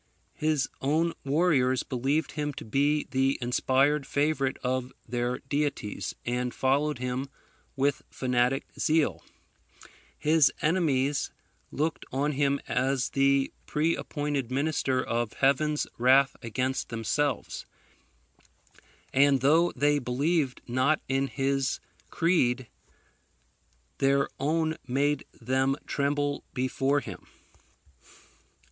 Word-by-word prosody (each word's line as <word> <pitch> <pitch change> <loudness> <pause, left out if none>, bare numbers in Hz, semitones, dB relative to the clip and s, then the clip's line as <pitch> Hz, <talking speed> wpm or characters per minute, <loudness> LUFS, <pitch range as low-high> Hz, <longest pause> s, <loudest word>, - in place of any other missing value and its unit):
His 155 -2 0
own 160 +5 +1
warriors 135 -4 +2
believed 135 +5 -1
him 150 -1 -3
to - - -8
be 145 +6 +1
the 135 +1 +2
inspired 135 +4 +2
favourite 140 -2 0
of 130 0 -1 0.2
their 120 +1 -1
deities, 145 -7 -2
and 125 0 -2
followed 140 +2 +1
him 125 +2 -3 0.5
with 140 0 +1
fanatic 125 +1 0
zeal: 160 -1 +1 0.9
his 155 -3 +4
enemies 145 -5 +1 0.4
looked 155 +3 -1
on 140 +3 0
him 140 0 +1
as 130 +1 0
the 135 0 +2
pre 160 +2 +1
appointed 145 -4 -3
minister 135 -1 0
of 120 -1 -2
Heaven's 150 +2 +2
wrath 135 +3 +5
against 130 +3 -2
themselves; 125 +4 -2 1.5
and, 140 -1 +4
though 160 +6 +4
they 145 +2 +2
believed 140 +3 0
not 130 +5 +2
in 135 +1 +1
his 135 +2 -1 0.3
creed, 130 -8 +1 1.3
their 140 0 +3
own 160 +3 0
made 140 +3 +1
them 130 +3 +1
tremble 145 0 -1
before 135 +2 +1
him. 95 -8 -9
135 Hz, 100 wpm, -28 LUFS, 130-150 Hz, 1.5 s, wrath